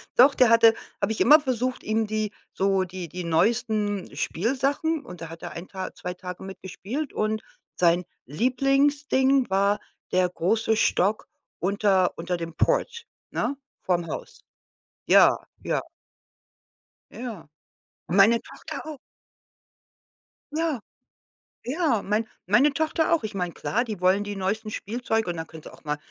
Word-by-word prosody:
Doch, 265 +3 +7
der 250 -2 +5
hatte 230 -1 +7 0.3
habe - - +1
ich 220 - -2
immer 300 +5 +8
versucht, 255 -3 -2
ihm 220 0 0
die 215 -1 -1 0.2
so 195 0 +2
die 185 -1 -6
die 180 +3 -5
neuesten 205 +1 0
Spielsachen 275 - 0
und 180 -1 -10
da 165 - -6
hat 165 0 -10
er - - -5
1 170 +2 -8
Tag 190 -1 -6
2 180 - -4
Tage 180 0 -8
mit 190 0 -9
gespielt 235 +10 -5
und 215 0 -1 0.3
sein 175 0 +3 0.2
Lieblingsding 270 - +2
war 200 +2 +2 0.3
der 185 0 +3
große 220 +6 +1
Stock 210 -1 +1 0.3
unter 195 -1 +2
unter 170 +1 -2
dem 165 -1 -6
Port, 470 -2 0 0.3
ne? 285 - -1 0.3
Vorm 175 -2 0
Haus. - - -7 0.6
Ja, - - +6 0.3
ja. - - 0 1.3
Ja, 225 -11 -7 0.6
meine 200 +7 +5
Tochter - - -8
auch. 310 -2 -7 1.6
Ja. 315 -7 -1 0.8
Ja, 270 - +1
mein 210 +3 0 0.2
meine 240 +10 +4
Tochter 315 +3 +1
auch. 330 - +2
Ich 215 - -4
meine, 180 -2 -2
klar, 230 +7 -1
die 215 -6 -6
wollen 185 +3 +3
die 205 -1 -5
neuesten 215 +3 -2
Spielzeuge 225 -1 -2
und 175 - -2
dann 160 0 -5
können 160 -1 -12
sie - - -10
auch - - -17
mal- 150 -1 -2
215 Hz, 145 wpm, -25 LUFS, 180-255 Hz, 1.6 s, immer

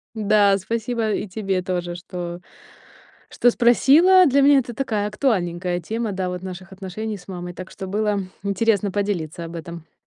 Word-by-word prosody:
Да, 205 -2 +3
спасибо, 225 +2 -2
и 205 - -2
тебе 195 -2 -2
тоже, 175 -1 -3
что 175 -1 -6 0.9
что 245 - +3
спросила. 310 +11 +5
Для 280 +1 +3
меня 280 0 +6
это 240 -1 -5
такая 220 -6 -1
актуальненькая 180 -6 -1
тема, 220 +4 -3
да, 185 -1 -2
вот 180 0 -5
наших 185 0 -8
отношений 205 +3 -5
с 180 - -17
мамой, 180 -2 -6
так 185 +2 -9
что 190 - -7
было 210 +1 0 0.2
интересно 200 0 +1
поделиться 180 -5 -2
об 165 +1 -8
этом. 165 -1 -10
200 Hz, 160 wpm, -22 LUFS, 180-225 Hz, 0.9 s, меня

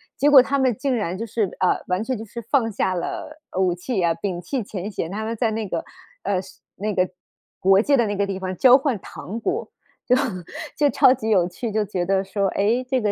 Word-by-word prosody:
结 285 +3 +3
果 275 -3 +9
他 280 +1 0
们 255 -3 +3
竟 275 -3 0
然 185 -5 -2
就 230 - -4
是 215 -3 -2
呃， 185 - +2
完 180 +2 0
全 255 +3 -2
就 220 - -6
是 230 +2 -8
放 230 0 +1
下 190 -2 0
了， 300 - -5
呃， - - -3
武 185 -2 +3
器 190 +4 -2
啊， 170 -1 +3
摒 175 +1 -4
弃 235 +8 -3
前 195 -1 -5
嫌。 175 -5 -4
他 215 +2 -3
们 230 +1 -2
在 225 0 +1
那 220 -1 -3
个， - - -3 0.4
呃， 195 -2 0
是 190 - -15 0.2
那 210 +2 -2
个 185 -1 +1 0.5
国 195 +2 +5
界 280 +3 +3
的 235 - +3
那 205 - -2
个 200 0 +1
地 195 -1 -3
方 185 -1 -4
交 255 +4 +7
换 270 -4 -1
糖 190 +6 -7
果。 380 - -2 0.4
就 250 - +4 0.6
就 295 - +4
超 - - +6
级 225 -4 -4
有 185 -5 +4
趣， 215 +6 -5
就 215 +1 +1
觉 185 -3 -2
得 195 +1 +1
说， 195 +1 -1
哎， 225 +7 +1
这 260 -2 +1
个 210 - +1
210 Hz, 260 characters per minute, -23 LUFS, 185-245 Hz, 0.6 s, 果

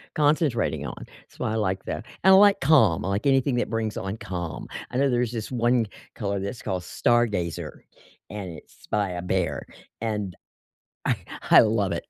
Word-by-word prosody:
concentrating 145 - +1
on. 60 - -7 0.2
So - - -6
I 110 - -1
like 95 -3 -1
that, - - -4 0.2
and 190 0 +7
I - - +9
like 205 0 +6
calm- 130 - +4
I - - -1
like 100 +7 -1
anything 135 -1 +3
that 120 - 0
brings 110 -2 -2
on 95 +3 -4
calm. 85 -5 -5 0.2
I 125 - -2
know 140 0 +3
there's 120 -1 +1
this 115 0 -5
one 120 -2 +2 0.3
color 100 -3 -2
that's 100 +5 -5
called 90 -1 -3
Stargazer, 105 -7 0 0.6
and 100 -3 -6
it's 80 - -14
by, 100 -4 0
uh, 90 - -3
Behr, 90 -6 -1 0.4
and 105 -5 -2 0.7
I - - +2 0.4
I - - +10
love 105 -3 +1
it. - - -4
110 Hz, 180 wpm, -25 LUFS, 95-120 Hz, 0.7 s, I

